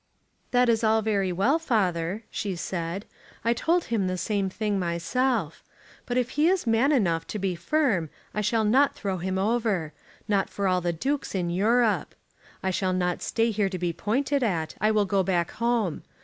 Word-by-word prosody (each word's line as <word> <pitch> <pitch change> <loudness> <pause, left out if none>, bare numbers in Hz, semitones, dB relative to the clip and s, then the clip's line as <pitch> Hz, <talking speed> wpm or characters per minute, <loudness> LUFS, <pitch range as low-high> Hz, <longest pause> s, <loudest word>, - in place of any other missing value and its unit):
"That 250 0 +3
is 230 -1 +2
all 220 0 +3
very 200 -3 +1
well, 230 - +2
father," 195 - 0
she 200 -3 -3
said; 170 +2 -4 0.4
"I 230 - +4
told 335 +8 +1
him 215 -5 -1
the 185 0 -2
same 200 0 -1
thing 205 0 -1
myself. 180 - -1 0.4
But 245 - -1
if 250 -1 0
he 300 +2 +2
is 370 -3 +2
man 230 +5 +3
enough 175 - +1
to - - -4
be 195 -2 -1
firm 185 - 0 0.2
I 210 - -1
shall 220 +2 +1
not 265 +7 +4
throw 195 -3 -3
him 190 +2 -2
over, 200 -6 0 0.3
not 200 -2 +1
for 200 -1 -2
all 185 -1 +2
the 175 0 0
dukes 270 - -2
in 175 -2 -1
Europe. 220 +5 +2 0.5
I 190 - +1
shall 185 0 0
not 180 -1 0
stay 230 0 +1
here 205 -2 0
to 185 - -4
be 175 -1 -1
pointed 270 - 0
at. 170 -9 -1
I 215 - +4
will 215 -1 +3
go 195 0 +2
back 175 -3 0
home. 230 -7 0
205 Hz, 190 wpm, -26 LUFS, 185-235 Hz, 0.5 s, I